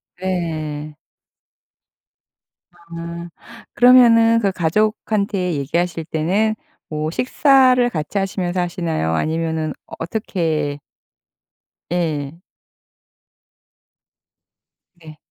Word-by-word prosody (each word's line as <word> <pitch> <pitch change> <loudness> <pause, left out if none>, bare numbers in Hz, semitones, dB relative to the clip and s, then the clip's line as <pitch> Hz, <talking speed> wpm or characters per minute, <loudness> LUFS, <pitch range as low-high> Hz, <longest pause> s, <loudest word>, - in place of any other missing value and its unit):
네. 155 -5 -4 1.7
아 170 0 -8 0.4
그러면은 230 -2 +6
그 200 -3 +1
가족한테 200 +1 0
얘기하실 165 +3 -2
때는 190 +8 0 0.3
뭐 155 0 -2
식사를 255 - +4
같이 155 -1 -4
하시면서 185 -2 -1
하시나요? 165 - -2
아니면은 160 - -1 0.3
어떻게 165 -6 -2 1.1
예. 160 -3 -2 2.6
네. 155 -2 -14
170 Hz, 155 characters per minute, -20 LUFS, 155-205 Hz, 2.6 s, 그러면은